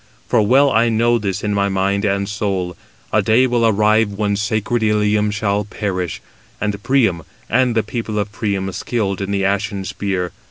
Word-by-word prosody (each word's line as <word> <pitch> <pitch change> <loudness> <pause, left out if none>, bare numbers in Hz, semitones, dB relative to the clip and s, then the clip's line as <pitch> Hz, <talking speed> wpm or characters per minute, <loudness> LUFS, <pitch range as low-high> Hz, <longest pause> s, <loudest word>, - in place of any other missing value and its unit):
For - - +3
well 135 +6 +4
I 115 0 +3
know 115 +1 +2
this 100 -3 -3
in 105 -1 0
my 100 0 +1
mind 100 +1 0
and 100 0 0
soul; 95 -4 -2 0.4
a - - +4
day 115 +4 +4
will 120 -2 +2
arrive 110 0 +3
when 100 0 0
sacred 110 +3 -1
Ilium 105 -1 +2
shall 105 -1 0
perish, 95 -4 -4 0.4
and 105 -1 -2
Priam, 115 -9 +2 0.3
and 125 0 +2
the 110 - +2
people 110 -1 -4
of 105 0 -2
Priam 100 -3 -2
skilled 100 0 -2
in 100 - -3
the 100 -1 0
ashen 100 0 -1
spear. 95 -3 -2
105 Hz, 175 wpm, -19 LUFS, 100-110 Hz, 0.4 s, well